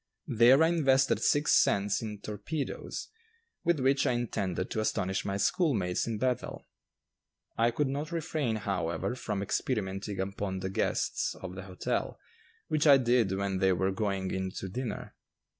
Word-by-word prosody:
There 125 +6 +6
I - - +5
invested 135 -5 +3
six 145 +1 +3
cents 100 +1 +3
in 105 -3 -6
"torpedoes," 110 +8 -5 0.5
with 170 -3 +2
which 135 +1 +2
I - - +2
intended 100 -6 -2
to - - -1
astonish 95 -3 -1
my 100 0 -1
schoolmates 100 - +1
in 115 -2 -2
Bethel. 125 +1 -2 0.9
I 115 +1 +3
could 140 +4 0
not 145 +4 -3
refrain, 155 -8 -1
however, 95 -1 -2
from 105 -5 -3
experimenting 100 -3 -2
upon 95 0 -3
the 95 0 -3
guests - - -1
of 95 -1 -8
the 95 0 -8
hotel, 95 -1 -3 0.5
which 155 0 +1
I 140 -1 +9
did 120 -5 +2
when 95 -1 -1
they 95 -1 +4
were 95 +2 +1
going 95 -2 -2
in 95 0 -2
to 95 - -4
dinner. 125 +5 -5
110 Hz, 155 wpm, -30 LUFS, 95-135 Hz, 0.9 s, I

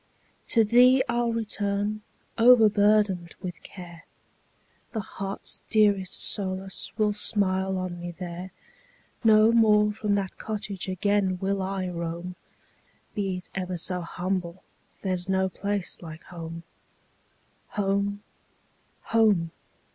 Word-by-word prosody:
To 230 - +4
thee 250 +4 +5
I 235 0 0
'll 235 -1 0
return, 210 -1 -1 0.3
overburdened 210 -6 +4
with 180 -1 -7
care; 175 -3 -11 0.9
The 225 - -2
heart's 195 0 -4
dearest 205 -4 +3
solace 190 -1 +2
will 210 -2 +2
smile 190 -2 +1
on 180 -1 -4
me 175 0 -6
there; 175 +1 -7 0.7
No 220 0 +6
more 210 -2 +4
from 205 -1 -1
that 195 -2 -3
cottage 205 -3 -4
again 190 0 +1
will 195 +1 -1
I 190 0 -2
roam; 170 +1 -5 0.8
Be 195 -3 -2
it 180 - -10
ever 185 -2 -3
so 180 +2 -1
humble, 180 +1 -4 0.4
there 190 -2 -1
's 180 +1 -4
no 190 0 +1
place 200 0 -3
like 160 -2 -10
home. 165 -1 -8 1.1
Home! 200 0 0 0.8
home! 210 -8 +2
195 Hz, 115 wpm, -26 LUFS, 180-210 Hz, 1.1 s, No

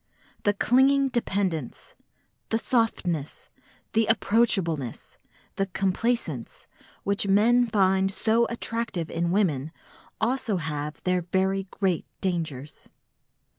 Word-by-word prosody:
The 205 -1 +3
clinging 270 +5 +4
dependence, 190 - -2 0.6
the 225 - +2
softness, 190 - -1 0.4
the 225 -1 +3
approachableness, 195 - +1 0.4
the 195 - 0
complaisance 190 - -2 0.4
which 200 0 +1
men 235 +5 +4
find 195 -2 +2
so 225 +4 +2
attractive 230 -7 -3
in 170 +1 -1
women 160 -7 +1 0.5
also 225 -3 0
have 150 -2 -4
their 180 0 +1
very 190 +2 0
great 185 -4 -1
dangers. 160 -7 -4
195 Hz, 95 wpm, -26 LUFS, 170-225 Hz, 0.6 s, clinging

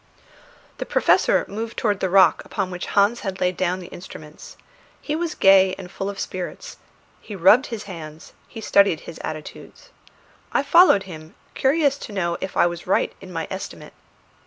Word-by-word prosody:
The - - -3
Professor - - +2
moved 225 +3 -6
towards 205 -3 0
the 190 - -1
rock 190 +1 +4
upon 190 -2 -4
which 180 0 -6
Hans 205 +4 +2
had 195 -2 -5
laid 180 0 0
down 185 +1 -1
the 180 - -9
instruments. 155 -4 -11 0.4
He 300 - -3
was 335 0 -3
gay 190 -1 +5
and 185 -2 -10
full 195 +1 -4
of 200 - -7
spirits; 185 -1 -6 0.4
he 210 - -9
rubbed 205 - +5
his 225 -3 -6
hands, 160 -5 -10
he 225 - -10
studied 200 -5 +3
his 165 - -10
attitudes. 155 - -9 0.6
I - - +2
followed 335 - +5
him, 160 -4 -11 0.2
curious 285 0 +1
to 210 - -9
know 170 -3 -1
if 190 - -5
I - - +5
was 175 -1 -4
right - - +1
in - - -11
my - - -4
estimate. - - -8
195 Hz, 175 wpm, -22 LUFS, 175-220 Hz, 0.6 s, gay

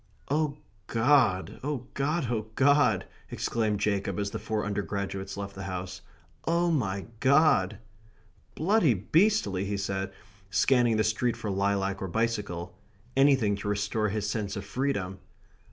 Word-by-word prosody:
"Oh 150 -1 +1 0.3
God, 115 -5 +2
oh 140 -3 -3
God, 150 +3 0
oh 110 -2 -2
God!" 135 -8 +4 0.2
exclaimed 110 -3 -1
Jacob, 100 -3 0
as 100 0 -2
the - - -4
four 110 -1 -2
undergraduates 100 -1 -3
left 100 0 -5
the 95 0 -7
house. 90 0 -5 0.5
"Oh, 170 +1 +2
my 100 -10 -1
God!" 130 - +4 0.8
"Bloody 170 - +3
beastly!" 130 - +2
he 100 0 -2
said, 95 -1 -2 0.4
scanning 115 +3 +3
the 110 - +3
street 115 +2 0
for 110 -3 -3
lilac 100 0 0
or 95 - -2
bicycle 95 -4 -2 0.4
anything 135 -7 +4
to 100 - -6
restore 105 +1 0
his 105 +1 -2
sense 105 -2 -2
of 100 - -5
freedom. 100 -6 -2
105 Hz, 135 wpm, -28 LUFS, 100-130 Hz, 0.8 s, God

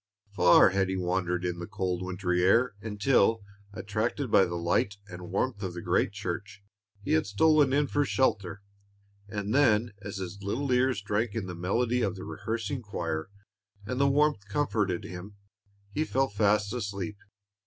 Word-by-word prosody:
Far 90 -1 +6
had 95 0 0
he 95 - -1
wandered 90 0 -1
in 90 -1 -2
the 85 - -6
cold 95 -4 -2
wintry 90 -1 -1
air, 115 +6 +4
until, 110 0 +2 0.3
attracted 105 +6 -2
by 95 - +6
the 85 - -4
light 85 +4 0
and 90 -2 -9
warmth 125 -6 -1
of 90 -3 -4
the 85 - -5
great - - +1
church, 100 +1 -6 0.4
he - - -3
had 80 +5 +2
stolen 145 +6 +4
in 145 +2 +3
for 145 +1 +1
shelter, 100 -8 0 0.6
and 105 +1 -3
then 120 -5 +3
as 100 -1 -6
his 95 +1 -6
little 130 +8 -2
ears 125 -4 +2
drank 105 +2 -1
in 110 -4 -2
the 90 - -6
melody 115 +8 0
of 100 -5 0
the 95 - -8
rehearsing 115 +5 -4
choir, 80 -6 -4 0.6
and 125 +5 -3
the 140 - +4
warmth 145 -7 +2
comforted 100 -6 0
him, 90 +3 -8 0.6
he 155 - 0
fell 135 -3 0
fast 105 0 +1
asleep. 100 -3 -4
100 Hz, 165 wpm, -28 LUFS, 95-120 Hz, 0.6 s, Far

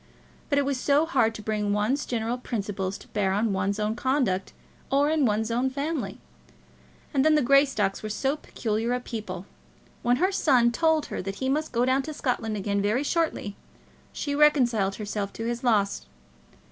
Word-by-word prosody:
But 285 - +2
it 285 - +3
is 275 -2 -1
so 290 +4 +3
hard 225 -9 +2
to 215 - -8
bring 210 -1 -1
one's 220 +8 0
general 235 +1 -2
principles 200 -5 -3
to - - -16
bear 195 -2 0
on 210 +1 +1
one's 195 +2 -1
own 210 +1 0
conduct 245 -8 0 0.4
or 285 +2 +3
in 305 -5 +3
one's 220 +2 0
own 245 +3 +1
family; 275 -7 -3 1.0
and 270 -2 +3
then 310 0 +5
the 300 - +3
Greystocks 265 -7 +3
were 215 - -5
so 265 +7 0
peculiar 230 -5 -2
a 250 - 0
people! 210 -7 -6 0.6
When 245 +1 +3
her 370 +8 +1
son 255 -10 +3
told 320 +4 +2
her - - -2
that 195 +1 -5
he 260 +5 -2
must 305 +3 0
go 240 +1 +2
down 260 +2 +2
to 305 +2 -7
Scotland 225 -6 -1
again 200 0 -1
very 215 +7 +1
shortly, 315 - -1 0.6
she 285 - -3
reconciled 250 -10 +3
herself 205 -1 -4
to 225 - -5
his 240 +1 -3
loss. 210 -5 +1
235 Hz, 185 wpm, -26 LUFS, 210-275 Hz, 1.0 s, then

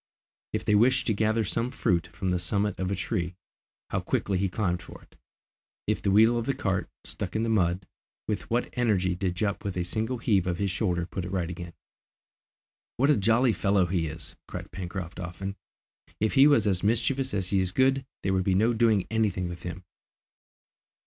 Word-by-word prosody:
If - - -2
they - - +3
wished 125 +5 +4
to 110 - +2
gather 110 +1 +1
some 115 +5 -1
fruit 90 -9 0
from 95 - -4
the 90 -1 +1
summit 100 +5 -1
of 95 -1 -1
a 100 - 0
tree, 90 -2 -2 0.6
how - - +1
quickly 95 -2 -1
he 95 0 +1
climbed 90 -2 -1
for 85 - -12
it! - - -23 0.7
If - - 0
the - - +1
wheel 110 +4 +5
of 115 - -4
the 135 - +1
cart, 95 -7 -1
stuck 90 -3 -6
in 110 - +1
the 115 - 0
mud, 90 -3 +1 0.4
with 105 - -3
what 120 +2 0
energy 100 -7 +2
did 90 0 -2
Jup 100 +2 -1
with 100 -2 -3
a 90 - 0
single 110 +7 -2
heave 100 -6 +1
of 85 -1 0
his 100 -1 0
shoulder 90 -4 0
put 95 +1 -5
it 90 - -5
right 90 -3 -1
again. 85 -1 -7 1.2
"What 140 +4 +4
a - - +5
jolly 115 +4 +3
fellow 100 0 +2
he 85 -2 0
is!" 80 +2 -8
cried - - -7
Pencroft 90 -1 -6
often. 90 +3 -5 0.6
"If 110 0 +1
he 140 +1 +7
was 140 -8 +4
as 95 -3 +1
mischievous 125 +4 +1
as 95 -2 -1
he 100 - +2
is 95 -1 +1
good, 135 +4 +3 0.2
there 95 - +1
would 95 -1 +2
be 95 0 +2
no 110 +5 +3
doing 110 -4 +3
any 110 -1 +3
thing 90 -1 -3
with 85 0 -7
him!" 90 +1 -6
100 Hz, 205 wpm, -27 LUFS, 90-110 Hz, 1.2 s, he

